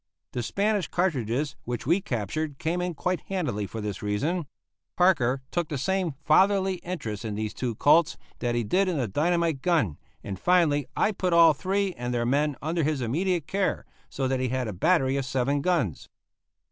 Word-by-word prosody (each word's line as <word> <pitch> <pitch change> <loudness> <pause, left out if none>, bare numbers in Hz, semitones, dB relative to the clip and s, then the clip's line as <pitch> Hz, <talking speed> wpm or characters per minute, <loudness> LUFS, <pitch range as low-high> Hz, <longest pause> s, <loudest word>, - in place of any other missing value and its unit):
The 120 - -3
Spanish 200 - 0
cartridges 145 - -1
which 120 -1 -4
we 170 +8 +3
captured 140 - -3
came 170 +5 -1
in 180 -1 -2
quite 180 +4 -1
handily 150 - -2
for 110 - -6
this 105 -2 -4
reason. 145 - -1 0.5
Parker 135 -8 +3
took 175 -3 -1
the 150 - -2
same 180 +1 -1
fatherly 190 +3 +4
interest 120 - -5
in 110 -2 -3
these 110 0 -3
two 120 -3 -3
Colts 155 +6 +4 0.2
that 120 -1 -1
he 120 - +1
did 185 - +2
in 180 -4 0
the 125 -4 0
dynamite 165 - +1
gun, 150 - +1 0.2
and 95 -2 -5
finally 160 -6 +3
I 215 - +3
put 185 -3 -1
all 165 -1 +7
three 190 +5 -1
and 120 -3 -4
their 120 0 0
men 145 +3 +1
under 165 +2 0
his 150 -1 0
immediate 165 +7 0
care, 195 +2 -1 0.2
so 135 - -2
that 130 0 0
he 130 -1 0
had 130 -1 -1
a 105 - -4
battery 135 - +2
of 135 - -2
seven 135 +2 0
guns. 155 - -1
150 Hz, 185 wpm, -26 LUFS, 120-180 Hz, 0.5 s, all